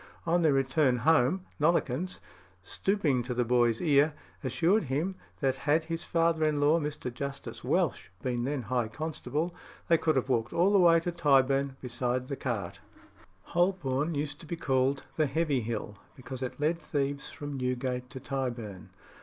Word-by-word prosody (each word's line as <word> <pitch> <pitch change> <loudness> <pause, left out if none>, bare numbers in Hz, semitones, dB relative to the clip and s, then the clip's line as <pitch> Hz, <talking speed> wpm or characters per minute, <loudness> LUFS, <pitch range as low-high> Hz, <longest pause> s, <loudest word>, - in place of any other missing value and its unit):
On 175 +1 +2
their 160 -3 +4
return 135 -1 +2
home, 160 +7 +3
Nollekens, 165 +1 +1 0.4
stooping 150 - 0
to 125 +1 -4
the 125 0 +1
boy's 120 -1 +3
ear, 150 -1 +3 0.3
assured 165 - +2
him 150 +8 -1 0.3
that 135 -2 +1
had 155 +2 +4
his 165 0 -4
father 165 -1 +1
in 155 -1 +2
law, 150 +3 +4
Mr. 145 -5 -4
Justice 140 +2 -6
Welch, - - 0
been 120 -2 -1
then 135 0 -2
High 120 +1 0
Constable, 155 +5 -3 0.4
they 165 -1 +5
could 155 -2 +2
have 130 -1 +1
walked 120 -3 0
all 180 +4 +3
the 200 - +5
way 170 -2 +6
to 175 - -2
Tyburn 140 -4 +3
beside 125 0 -2
the 140 - -2
cart. 115 -10 -3 0.6
Holborn 170 -4 0
used 145 0 -3
to 165 - -12
be 170 - -3
called 135 -3 +1
"the 155 -2 +3
Heavy 145 -2 +1
Hill" 110 -2 -4 0.2
because 130 -1 -8
it 130 +1 -4
led 160 +3 +1
thieves 140 -3 -2
from 145 -1 -6
Newgate 125 -1 -2
to 130 +1 -8
Tyburn. 120 -8 -4
140 Hz, 165 wpm, -29 LUFS, 125-160 Hz, 0.6 s, way